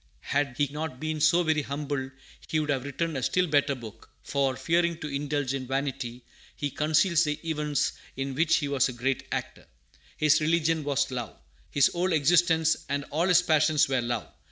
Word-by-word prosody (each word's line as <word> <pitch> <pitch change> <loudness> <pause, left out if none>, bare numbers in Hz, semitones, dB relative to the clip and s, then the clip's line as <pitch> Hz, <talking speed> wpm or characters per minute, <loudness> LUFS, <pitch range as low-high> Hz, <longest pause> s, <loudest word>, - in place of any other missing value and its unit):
Had 140 -2 +1
he 145 - +2
not 150 -3 -5
been 155 0 -3
so 170 +3 +4
very 160 -2 +1
humble, 140 -1 -3 0.4
he 155 - 0
would 150 -1 -1
have 135 -2 -1
written 160 +3 -3
a 135 - -2
still 180 +8 +2
better 145 -3 +2
book; 115 -4 -11
for, 135 -2 0
fearing 170 +3 +1
to 150 - -6
indulge 145 -1 -2
in 130 -2 -4
vanity, 135 -2 -3 0.3
he 145 -1 -3
conceals 155 +4 +2
the 150 -1 -2
events 150 -3 0 0.3
in 135 0 -3
which 160 +4 +3
he 145 - 0
was 135 -2 +2
a - - -5
great 130 +2 -2
actor. - - -5 0.5
His 155 0 +4
religion 160 0 +1
was 140 -1 0
love. 120 -3 -5 0.3
His 140 -2 +3
whole 180 +1 -1
existence 160 +1 +3
and 140 0 -1
all 165 +5 +1
his 180 -1 +5
passions 155 -2 +3
were 130 -2 +1
love. 120 -2 -3
145 Hz, 185 wpm, -27 LUFS, 135-160 Hz, 0.5 s, his